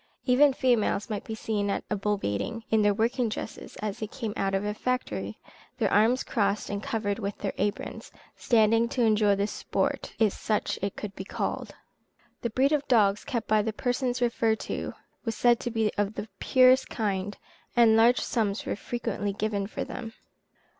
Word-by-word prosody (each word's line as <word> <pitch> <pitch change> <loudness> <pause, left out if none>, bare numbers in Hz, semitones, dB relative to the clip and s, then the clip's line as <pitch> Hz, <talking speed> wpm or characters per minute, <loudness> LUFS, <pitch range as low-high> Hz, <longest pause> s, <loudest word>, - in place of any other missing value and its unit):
Even 275 +3 +5
females 240 -4 +1
might 210 - -3
be 220 - -5
seen 210 -2 -1
at - - -1
a - - +2
bull 205 +1 0
baiting, 105 - -3
in 220 -1 +4
their 205 0 +4
working 230 +3 +1
dresses 220 - -6
as 210 +1 -3
they 215 - -3
came 225 -2 -5
out 195 0 0
of 195 +2 -1
a 210 - -1
factory, 210 - -2 0.4
their - - +1
arms 225 +5 +4
crossed 205 -3 0
and 200 0 -3
covered 210 -2 -2
with 200 -2 -3
their 200 - -3
aprons, 205 +1 -3 0.2
standing 230 0 +3
to 245 - 0
enjoy 215 -2 +4
the 200 +1 0
sport, 210 - -2
if 215 -3 +3
such 215 -1 -1
it 200 0 -2
could 205 -2 -6
be 190 - -5
called. - - -4 0.7
The 235 - -1
breed 265 +5 +2
of 290 -2 +1
dogs 205 -4 +3
kept 235 -3 -3
by 215 0 +4
the 220 +1 -2
persons 245 +1 -1
referred 230 -2 +1
to - - -4 0.3
was 225 -2 -2
said 240 0 +4
to 240 - -3
be 225 -2 +1
of 205 +1 0
the 215 - -5
purest 255 0 +5
kind, 205 -2 -2 0.4
and 230 -2 +6
large 235 +3 +5
sums 215 -3 -1
were - - -1
frequently 210 -2 -3
given 205 -1 -1
for - - -4
them. 225 -3 -7
220 Hz, 190 wpm, -27 LUFS, 205-235 Hz, 0.7 s, and